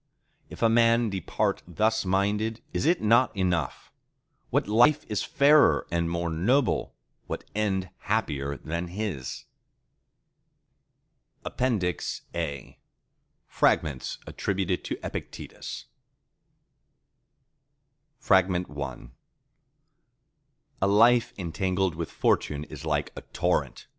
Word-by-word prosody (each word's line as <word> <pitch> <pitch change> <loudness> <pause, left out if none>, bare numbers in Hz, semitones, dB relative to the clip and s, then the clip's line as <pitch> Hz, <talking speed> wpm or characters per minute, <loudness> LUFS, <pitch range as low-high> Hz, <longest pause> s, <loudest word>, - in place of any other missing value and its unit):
—If - - -6
a - - +7
man 115 0 +3
depart 95 -3 -1
thus 110 +4 +1
minded, 105 +4 0
is - - 0
it 175 -4 +2
not 115 +1 +4
enough? 90 -3 -1 0.6
What - - +1
life 125 +8 +4
is 105 - -1
fairer 145 +2 +4
and 85 -1 0
more 85 0 -2
noble, 120 - +1 0.3
what - - -4
end 95 -3 -1
happier 75 -10 -1
than 85 +2 -4
his? 90 -8 -5 2.0
(APPENDIX 105 -9 -1
A) 75 -6 -5 0.7
Fragments 70 -4 0
Attributed 95 -2 -2
to - - -3
Epictetus - - -7 2.4
I 95 -1 +7 2.4
A 95 - +3
life 115 +4 +5
entangled 95 0 -1
with 85 +1 -5
Fortune 75 0 0
is 75 -2 -10
like 75 -2 -1
a - - -7
torrent. - - -1
95 Hz, 95 wpm, -27 LUFS, 85-115 Hz, 2.4 s, a